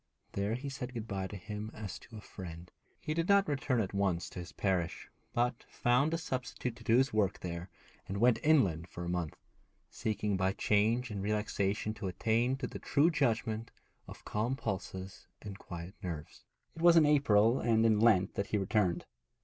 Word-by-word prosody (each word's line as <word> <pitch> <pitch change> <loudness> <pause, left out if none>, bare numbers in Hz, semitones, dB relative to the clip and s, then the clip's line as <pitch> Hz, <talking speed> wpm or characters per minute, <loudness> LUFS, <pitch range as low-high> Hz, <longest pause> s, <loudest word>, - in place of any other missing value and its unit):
There 100 +3 -1
he 130 +4 -5
said 130 -2 -5
good 115 -1 -4
bye 95 -2 -3
to 105 - -8
him 105 +3 -6
as 105 -2 -6
to 115 - -12
a - - -8
friend. 90 -3 -9 0.3
He 155 - -3
did 165 +3 -1
not 200 0 +5
return 135 -3 0
at 100 -3 -1
once 95 -3 0
to - - -7
his 85 - -7
parish, 90 -4 -1 0.2
but 120 0 0
found 125 +6 +2
a 165 - +1
substitute 125 -5 -4
to - - -13
do 115 -1 +4
his 130 -2 +2
work 105 -3 +1
there, 85 +1 -5 0.4
and 100 - -3
went 120 +1 +4
inland 95 - +3
for 85 -1 -7
a - - -3
month, 90 -4 -2 0.6
seeking 105 -2 -1
by 95 +1 +1
change 110 +5 +2
and 100 -2 -3
relaxation 105 0 -1
to 100 - -5
attain 115 +7 +1
to 135 - -4
the - - -6
true 150 +4 +3
judgment 115 -5 0 0.4
of - - -11
calm 115 +5 -1
pulses 95 -5 -5
and 100 -1 -8
quiet 85 -1 -8
nerves. 80 -4 -6 0.3
It 165 - -8
was 170 0 +7
in 160 - +7
April 120 -6 +4
and 115 -1 +3
in 110 -2 +4
Lent 105 -5 +4
that 100 - -2
he 105 - 0
returned. 95 -2 +1
105 Hz, 190 wpm, -32 LUFS, 95-125 Hz, 0.6 s, was